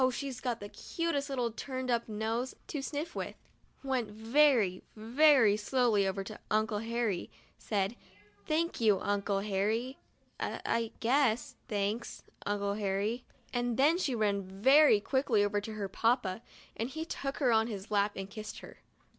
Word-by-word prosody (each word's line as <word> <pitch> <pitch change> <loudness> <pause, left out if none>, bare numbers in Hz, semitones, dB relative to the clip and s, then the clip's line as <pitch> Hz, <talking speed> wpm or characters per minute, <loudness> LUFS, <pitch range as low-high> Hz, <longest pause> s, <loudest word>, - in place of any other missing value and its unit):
she's 265 0 -4
got 240 -3 -2
the 205 - -7
cutest 300 +4 -3
little 250 -4 -1
turned 255 +2 -4
up 235 -1 0
nose 225 +4 -2
to 290 - -4
sniff 300 +4 -4
with), - - -4 0.5
went 260 -5 -1
very, 225 -3 +3
very 235 0 +5
slowly 215 -2 +2
over 195 +1 -2
to 210 +2 -9
Uncle 215 -1 +1
Harry, 225 -4 -1 0.3
said: 200 +1 -1 0.5
"Thank 325 -2 0
you, 210 -4 +4
Uncle 200 -1 0
Harry. 215 +6 -1 0.4
I - - -3
— - - -35
I 230 -1 0
— - - -33
guess 255 +1 +2
— - - -39
thanks, 210 +2 -2 0.2
Uncle 200 0 0
Harry," 205 +4 -1 0.3
and 245 -1 0
then 305 +6 +4
she 270 -9 0
ran 205 -3 +1
very - - -9
14 190 +1 -12
MONDAY— 195 - -12
MY 275 -3 +7
FIRST - - -19
BATH - - -20
quickly 260 -6 +3
over 205 0 0
to 220 +2 -6
her 205 -2 -3
papa, 225 -1 +1 0.3
and 230 +3 -2
he 315 +3 -5
took 275 -3 -4
her 255 -4 +3
on 220 0 +3
his 205 -2 -7
lap 205 0 +2
and 195 0 -5
kissed 215 +1 -8
her. - - -12
225 Hz, 180 wpm, -31 LUFS, 205-260 Hz, 0.5 s, MY